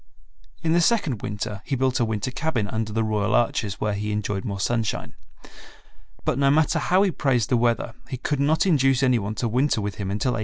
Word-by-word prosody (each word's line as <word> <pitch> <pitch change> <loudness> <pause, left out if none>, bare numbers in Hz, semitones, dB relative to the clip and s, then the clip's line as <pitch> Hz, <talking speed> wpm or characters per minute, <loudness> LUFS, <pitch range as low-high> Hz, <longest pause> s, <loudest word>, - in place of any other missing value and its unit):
In 160 0 +2
the 175 - +4
second 170 - +1
winter 105 0 -4
he 140 - -2
built 130 0 +1
a 120 - +3
winter 110 +2 -2
cabin 135 -5 -1
under 110 0 -2
the 115 +1 0
Royal 105 0 0
Arches, 115 -4 0
where 105 -1 0
he 105 +1 -3
enjoyed 105 -2 -2
more 100 -4 -4
sunshine. 115 +1 -1 1.1
But - - 0
no 140 0 +4
matter 155 +2 +3
how 185 +2 +3
he 195 - +2
praised 125 -8 0
the 125 - +3
weather 115 -1 0 0.2
he 130 - -4
could 145 +3 -2
not 155 +7 +2
induce 135 -6 +3
any 125 -2 +3
one 105 +1 -4
to 120 - -1
winter 125 +2 +1
with 105 -1 -4
him 95 - -3
until 105 +6 0
1864. 115 - -2
120 Hz, 220 wpm, -24 LUFS, 105-140 Hz, 1.1 s, the